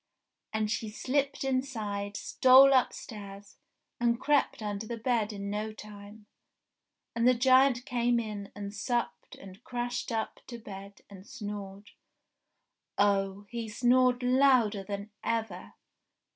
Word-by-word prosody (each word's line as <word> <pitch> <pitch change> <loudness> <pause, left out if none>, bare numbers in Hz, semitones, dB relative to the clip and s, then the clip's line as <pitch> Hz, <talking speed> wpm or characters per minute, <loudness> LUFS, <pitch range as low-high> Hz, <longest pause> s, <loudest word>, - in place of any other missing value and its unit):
And 215 -1 -1
she 220 -1 -2
slipped 275 +6 -1
inside, 220 -7 -2
stole 265 +2 +6
upstairs, 205 -5 -3 0.4
and 235 0 +1
crept 290 -6 +1
under 205 +1 -4
the 235 - -4
bed 225 -2 0
in 200 -1 -5
no 210 +1 -3
time. 210 0 -12 0.9
And 235 +1 +2
the 255 - +5
giant 255 0 +4
came 240 -3 +1
in, 210 -3 -6
and 200 0 -6
supped, 240 +4 -3
and 195 +3 -13
crashed 245 0 -4
up 225 -1 -3
to 240 - -7
bed, 200 -2 -11
and 195 0 -13
snored. 205 -2 -8 1.1
Oh! 200 0 +1
he 230 -2 -4
snored 250 +2 +3
louder 250 -5 +3
than 200 +1 -6
ever 220 -6 -3
220 Hz, 125 wpm, -29 LUFS, 205-245 Hz, 1.1 s, stole